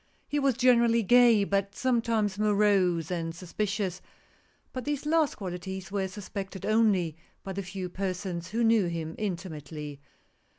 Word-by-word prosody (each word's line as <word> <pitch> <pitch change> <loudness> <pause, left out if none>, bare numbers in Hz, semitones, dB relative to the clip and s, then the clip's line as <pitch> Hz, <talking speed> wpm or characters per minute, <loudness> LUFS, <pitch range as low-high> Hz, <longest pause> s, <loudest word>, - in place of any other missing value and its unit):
He 290 - 0
was 275 -4 +2
generally 235 -2 +4
gay, 235 0 +6
but 200 0 -1
sometimes 230 -5 +1
morose 200 -5 +2
and 165 -2 -3
sus 175 0 -11
picious; 200 -3 -1 0.7
but 255 - -4
these 290 +1 -3
last 315 -2 +2
qualities 190 0 -6
were 195 -1 -1
suspected 195 -1 -6
only 205 -7 +2 0.3
by 195 - -5
the 200 - -3
few 185 0 -5
persons 180 -1 -4
who 230 +4 0
knew 225 -4 +4
him 165 -1 -4
intimately. 155 -7 -5
200 Hz, 140 wpm, -28 LUFS, 180-225 Hz, 0.7 s, gay